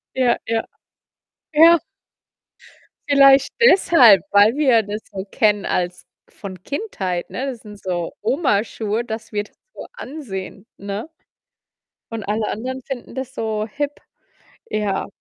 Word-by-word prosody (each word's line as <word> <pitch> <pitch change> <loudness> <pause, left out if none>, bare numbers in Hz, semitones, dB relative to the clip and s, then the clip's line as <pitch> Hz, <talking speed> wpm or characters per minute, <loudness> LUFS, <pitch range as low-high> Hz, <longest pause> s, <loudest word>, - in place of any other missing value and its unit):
Ja, 250 -2 +2
ja, 225 0 0 0.9
ja. 330 +2 +7 1.3
Vielleicht 275 -1 +6
deshalb, 330 - +6
weil 205 +4 +5
wir 265 -6 +4
das 210 +1 -6
so 190 -1 -5
kennen 210 -1 +2
als 180 0 -2 0.2
von 185 -3 -10
Kindheit, 195 - -4
ne, 260 - -4
das 260 -4 -5
sind 210 -2 -12
so 175 -3 -3
Oma-Schuhe, 225 -3 0
das 225 0 -6
wir 205 -1 -1
das - - -21 0.2
so - - -8
ansehen, 225 - -7
ne? 200 +5 -5 1.0
Und 225 -2 -4
alle 215 +1 -1
Anderen 260 +4 -5
finden 255 -3 -7
das 260 0 -5
so 220 -4 -2
hip. 285 +6 -3 0.8
Ja. 205 -2 -1
220 Hz, 125 wpm, -20 LUFS, 205-270 Hz, 1.3 s, ja